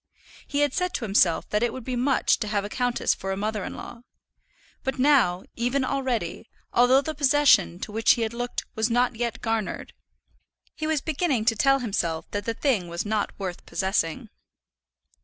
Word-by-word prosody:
He 285 0 0
had 290 -2 +2
said 360 -1 -1
to 235 - -2
himself 190 -5 +2
that 210 - +1
it 240 -1 +1
would 260 0 -7
be 255 +1 -3
much 260 +2 +2
to 215 - -3
have 205 -1 -1
a - - -5
countess 245 +1 0
for 195 - -5
a 190 - -2
mother 210 0 -2
in - - -6
law; 230 - -9 0.8
but 265 0 -2
now, 255 -10 +3
even 250 +3 0
already, 255 -8 -2 0.2
although 245 +3 +5
the 315 +2 -4
possession 285 - +4
to - - -5
which 225 +1 +4
he 235 - -1
had 220 0 -3
looked 245 +1 -4
was 220 +1 0
not 245 +1 +2
yet 235 -1 -3
garnered, 225 -3 -2 0.8
he 310 - -4
was 315 -3 +1
beginning 290 -7 0
to 225 -1 +3
tell 275 +5 +4
himself 195 -10 -2
that 205 0 -3
the 230 - -2
thing 225 -12 0
was 170 +3 -4
not 210 -1 -1
worth 185 -3 -5
possessing. 190 +2 -1
235 Hz, 190 wpm, -25 LUFS, 210-265 Hz, 0.8 s, although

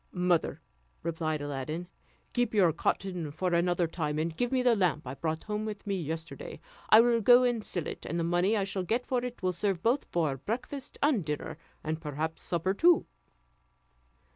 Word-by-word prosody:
"Mother," 180 -2 +1 0.4
replied 155 -2 -2
Aladdin, 145 +5 -4 0.5
"keep 245 -3 0
your 180 -6 +5
cotton 180 -1 -1
for 175 +5 -2
another 175 +1 +2
time, 155 -2 -2
and 160 +1 -1
give 245 +6 -1
me 255 -1 +2
the 245 -2 +5
lamp 175 -7 +1
I 125 - -5
brought 160 +2 -3
home 210 0 -3
with 215 -2 -5
me 200 - -1
yesterday; 160 +1 -6 0.3
I 220 - +9
will 235 -1 +3
go 245 +3 +7
and 240 -3 +1
sell 175 -6 -3
it, - - -6
and 170 +3 -2
the - - 0
money 175 +6 +2
I 200 - +1
shall 195 0 -3
get 230 +7 -1
for 250 -2 0
it 245 -4 -6
will 185 0 +1
serve 185 -1 -1
both 245 +5 +2
for 155 -6 0
breakfast 255 - -5
and 280 - +3
dinner, 150 +1 -4 0.2
and 155 +1 -3
perhaps 155 +1 -3
supper 175 +2 0
too." 340 - +5
180 Hz, 190 wpm, -30 LUFS, 160-220 Hz, 0.5 s, I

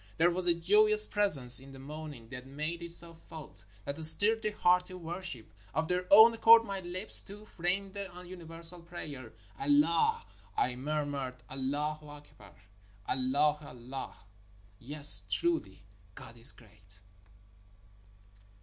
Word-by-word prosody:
There 170 +2 0
was 180 +1 0
a 170 - 0
joyous 210 +5 +2
presence 140 - +7
in 135 +1 -15
the - - -15
morning 145 -3 -13
that 125 0 -13
made 155 +5 -8
itself 170 -1 -4
felt 120 -12 -15
— 100 - -31
that 145 +3 -6
stirred 210 +8 +6
the 215 - -4
heart 180 -3 -2
to 185 - -13
worship. 170 - -11 0.2
Of 160 0 -4
their 180 0 -5
own 220 +3 +5
accord 230 0 +3
my 195 -3 -9
lips, 185 +3 -2
too, 210 +2 -16
framed 190 +1 -7
the 200 -1 -9 0.2
universal 170 -1 -3
prayer. 150 -8 -13
' 100 - -30
' 95 - -29
Allah! 145 +2 -1 0.2
" 100 0 -32
I 125 0 -2
murmured, 140 -2 -8
' - - -33
' - - -33
Allah 145 +3 -6
Akbar! 145 -1 -18 0.5
Allah 140 +4 -3
il 145 - -15 0.3
Allah! 135 - -10 0.6
Yes, 145 +4 +6
truly, 345 -1 -2 0.3
God 115 - -15
is 115 +2 +5
great." 100 -3 -20
160 Hz, 155 wpm, -27 LUFS, 135-180 Hz, 0.6 s, presence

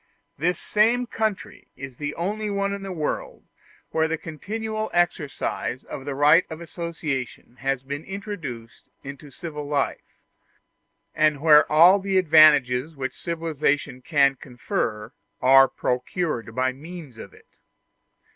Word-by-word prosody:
This 175 +3 0
same 230 +4 +2
country 220 -3 -4
is 135 -2 -9
the 150 0 -4
only 210 +5 -3
one 200 0 -1
in 200 - -5
the 195 -1 -6
world 155 -4 -4 0.5
where 160 0 +1
the 160 0 -2
continual 215 +8 -5
exercise 150 -6 -1
of 135 - -8
the 140 - -4
right 150 +5 +5
of 160 -1 -7
association 160 -8 -5
has 135 -1 -2
been 140 +3 -5
introduced 170 - -8
into 140 +1 -9
civil 150 -1 -7
life, 145 -1 -2 1.0
and 155 -2 +2
where 150 0 +5
all 175 +6 +7
the 195 0 0
advantages 155 -4 +5
which 130 -2 -4
civilization 150 -5 -2
can 140 -1 +3
confer 120 - -4 0.3
are 135 +1 +7
procured 125 -2 -3
by 130 0 +1
means 150 -3 -11
of - - -10
it. - - -20
155 Hz, 130 wpm, -24 LUFS, 135-180 Hz, 1.0 s, all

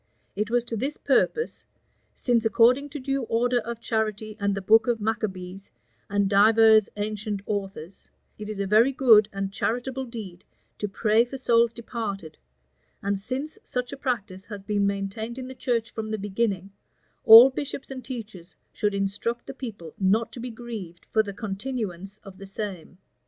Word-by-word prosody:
It 210 +2 -1
was 240 0 +1
to 230 - -4
this 270 +7 -3
purpose: 465 +1 +1 0.5
"Since, 240 -3 +1
according 245 +5 +4
to 295 +1 -6
due 275 +1 -1
order 245 +2 +1
of 235 0 -6
charity, 215 -2 -2
and 200 -1 0
the 195 - -3
book 225 +5 +5
of 240 -2 +1
Maccabees, 195 -3 -4 0.4
and 200 0 +1
divers 215 +1 +6
ancient 210 -1 -3
authors, 195 -4 -5 0.3
it 210 0 -6
is 210 -2 -5
a 200 - 0
very 220 +7 +4
good 225 -6 +5
and 195 0 -4
charitable 250 +5 -2
deed 205 -7 -9 0.4
to 210 - -1
pray 215 +2 +3
for 245 +3 -7
souls 235 -2 +3
departed, 220 -7 -6 0.6
and 200 0 0
since 265 +9 -5
such 250 0 -3
a - - -6
practice 205 -8 -3
has 205 -3 -8
been 205 -1 +1
maintained 200 +4 -3
in 255 -1 -6
the 260 - -7
church 235 -3 -1
from 220 -1 -5
the 220 - -2
beginning, 200 -1 -2 0.5
all 230 +4 +11
bishops 275 0 -5
and 260 -1 -7
teachers 215 -8 -8 0.2
should 205 -1 0
instruct 200 +4 -2
the - - -7
people 210 - -8
not 205 +4 +2
to - - -9
be 245 +2 -5
grieved 220 -7 -8
for 220 - +4
the 205 -2 -5
continuance 200 -2 -5
of 195 -1 -12
the 195 - -9
same. 195 -3 -6
220 Hz, 170 wpm, -26 LUFS, 200-240 Hz, 0.6 s, all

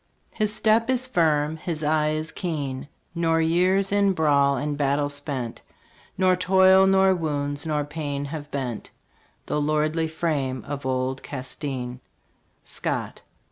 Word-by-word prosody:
His 215 -2 0
step 220 +2 +2
is 255 -1 +1
firm, 160 - +1
his 160 -1 -4
eye 150 0 +2
is 155 +1 -2
keen, 145 -8 -4 0.3
Nor 165 -1 +1
years 185 +4 +2
in 200 -1 +3
brawl 140 -4 +3
and 145 +3 -2
battle 145 0 +1
spent, 140 -5 -4 0.6
Nor 185 -1 +4
toil, 190 +1 +5
nor 190 0 +5
wounds, 145 -3 -2
nor 150 -1 0
pain 145 -1 -4
have 145 0 -6
bent 130 -6 -4 0.6
The 150 - -1
lordly 155 +2 +1
frame 150 -5 -2
of 140 -2 -4
old 130 +1 -1
Castin. 130 -2 -5 0.7
Scott. - - -3
155 Hz, 135 wpm, -24 LUFS, 140-175 Hz, 0.7 s, toil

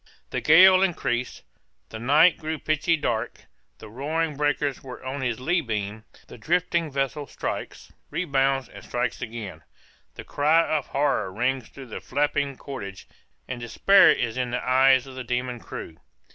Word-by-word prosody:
The - - -2
gale 185 +4 +7
increased 125 -10 -1 0.5
the 110 - -7
night 150 +9 +4
grew 160 0 -3
pitchy 155 +2 +1
dark 120 -5 -3 0.3
the - - -11
roaring 150 +7 -2
breakers 145 -1 -1
were 130 0 -10
on 135 +1 -4
his 120 -3 -2
lee 170 +7 +1
beam 110 -3 -4 0.2
the - - -13
drifting 170 +5 0
vessel 135 +1 -2
strikes, - - -6 0.2
rebounds, 135 -5 0
and - - -13
strikes 120 -1 -3
again 110 -9 -7 0.5
the - - -8
cry 160 +3 +2
of 145 - -2
horror 135 -9 0
rings 125 +4 -1
through 135 - -11
the 120 - -8
flapping 145 0 -1
cordage, 100 -9 -8 0.4
and 125 -2 -5
despair 195 - +5
is 120 0 -1
in 125 -1 -1
the 125 +1 -3
eyes 130 0 +5
of 135 - -11
the 130 0 -6
demon 125 0 -3
crew. 80 -6 -9
135 Hz, 160 wpm, -25 LUFS, 120-150 Hz, 0.5 s, gale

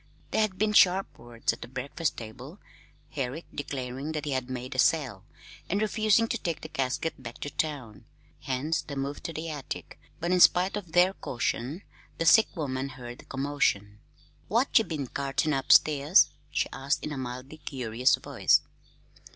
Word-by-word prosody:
There - - +2
had 205 -4 0
been 210 +2 +1
sharp 190 -1 +4
words 120 -1 -2
at - - -12
the - - -7
breakfast 140 +6 -3
table, 125 - -9 0.5
Herrick 140 +3 -4
declaring 135 +1 -4
that 150 -1 -3
he 145 - -2
had 130 -1 -2
made 130 +1 -5
a 130 - -4
sale, 130 - +2 0.4
and 200 - +1
refusing 215 +1 +3
to 235 - -1
take 170 -5 -3
the 155 - -8
casket 135 +2 -2
back 120 -2 -8
to 145 - -4
town; 135 -10 -4 0.3
hence 140 +5 -1
the 145 - -8
move 140 +1 -4
to - - -5
the 160 +1 -5
attic; 145 -3 -7 0.2
but 170 +2 -1
in 180 - +3
spite 180 +2 +5
of 180 -6 -6
their 180 +2 +5
caution, 130 +3 -3 0.3
the 165 - -1
sick 220 +7 +7
woman 135 -4 -3
heard 125 -2 -9
the - - -14
commotion. 135 -7 -1 0.5
"What 235 +7 +1
ye 225 - 0
been 155 -5 -3
cartin' 140 +4 -1
upstairs?" 145 +4 +5 0.2
she - - 0
asked 135 +2 -1
in 150 - -4
a 145 - -4
mildly 130 +4 -6
curious 125 -3 +1
voice. - - +2
145 Hz, 175 wpm, -28 LUFS, 130-165 Hz, 0.5 s, sick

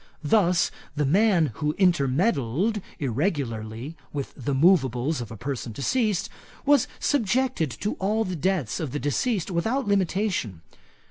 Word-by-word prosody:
Thus, 180 +1 +3 0.2
the 150 -1 +1
man 175 - +3
who 150 0 -1
intermeddled 175 - +2 0.2
irregularly 130 - -2 0.2
with 140 -2 -4
the 135 +1 -2
moveables 135 -3 +3
of 115 - -6
a 110 - -8
person 120 -1 -4
deceased, 210 - 0 0.4
was 285 -3 +4
subjected 250 - +1
to 210 - 0
all 215 +4 +1
the 185 -3 -3
debts 170 - -1
of 150 -6 -4
the 145 - -1
deceased 190 - -1
without 225 +10 0
limitation. 185 - 0
165 Hz, 130 wpm, -25 LUFS, 135-205 Hz, 0.4 s, was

